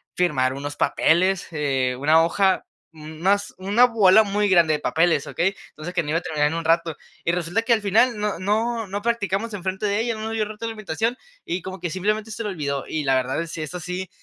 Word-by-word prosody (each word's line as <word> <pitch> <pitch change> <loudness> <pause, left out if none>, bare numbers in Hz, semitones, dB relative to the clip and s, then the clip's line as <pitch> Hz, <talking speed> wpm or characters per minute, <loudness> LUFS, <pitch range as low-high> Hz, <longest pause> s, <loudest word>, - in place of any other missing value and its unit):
firmar 135 -8 +1
unos 145 +1 -6
papeles, 185 +3 +2
eh, 135 -5 0
una 155 +4 +4
hoja, 190 +3 +1 0.3
más 160 +6 -1
una 205 +6 +4
bola 220 -3 +5
muy 205 0 0
grande 170 -4 +4
de 150 - -1
papeles, 160 -3 +1
¿okey? 190 +3 0
Entonces, 160 +4 -8
que - - +1
no 150 - -6
iba 160 - +1
a - - -14
terminar 150 -3 0
en 160 - -4
un 165 -1 -4
rato 165 -1 +1 0.3
y 170 - +1
resulta 175 +4 -1
que 230 +1 +2
al 225 - +1
final 225 +4 +3
no 210 -3 -2
no 220 +3 -1
no 200 +2 -4
practicamos 225 -2 -1
enfrente 190 +1 -3
de 205 0 +1
ella, 230 0 -1
no 215 - -7
nos 220 - -3
dio 220 -1 0
roto 215 +2 -7
la 225 - -3
invitación, 220 +2 -2 0.3
y 180 +2 -3
como 190 +2 -7
que 175 - -3
simplemente 210 +4 -1
se 215 - -6
le 210 - -3
olvidó. 140 -7 -3
Y 155 - -2
la 135 -1 +2
verdad 130 +5 -1
si 160 0 -6
es 155 +3 -6
así, 180 +1 -5
185 Hz, 230 wpm, -23 LUFS, 160-210 Hz, 0.3 s, bola